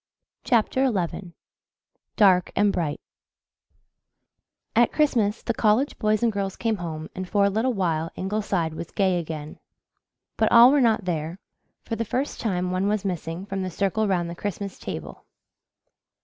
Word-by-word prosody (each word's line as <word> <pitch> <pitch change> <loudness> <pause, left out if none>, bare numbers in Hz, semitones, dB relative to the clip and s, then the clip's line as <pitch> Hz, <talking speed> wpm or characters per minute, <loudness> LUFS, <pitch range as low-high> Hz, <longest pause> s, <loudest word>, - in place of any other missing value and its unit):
CHAPTER 255 +3 +2
XI 180 -2 -3 0.8
DARK 185 -4 +4
AND 205 -1 +3
BRIGHT 155 -4 -2 1.8
At 235 0 +4
Christmas 235 -9 +1
the 235 - -1
college 220 +6 +1
boys 215 +1 +1
and 235 - +3
girls 200 -2 -3
came 225 -2 -1
home 160 -3 -5
and 185 -1 -6
for 200 -1 +3
a 200 - +2
little 230 +5 +1
while 165 -4 0
Ingleside 190 -4 -1
was 160 +1 -7
gay 190 -3 +1
again. 155 -2 -7 0.8
But - - +2
all 240 +2 +9
were 285 -1 +4
not 220 -5 +2
there 165 -1 -3 0.5
for 225 - -4
the 230 - -1
first 255 +6 -3
time 180 -4 -1
one 185 +2 0
was 210 -1 0
missing 175 -1 -4
from 195 -1 -4
the 185 - -2
circle 200 +4 0
round 180 -3 0
the 170 - -5
Christmas 200 +1 -5
table. 75 -4 -7
195 Hz, 155 wpm, -25 LUFS, 175-220 Hz, 1.8 s, all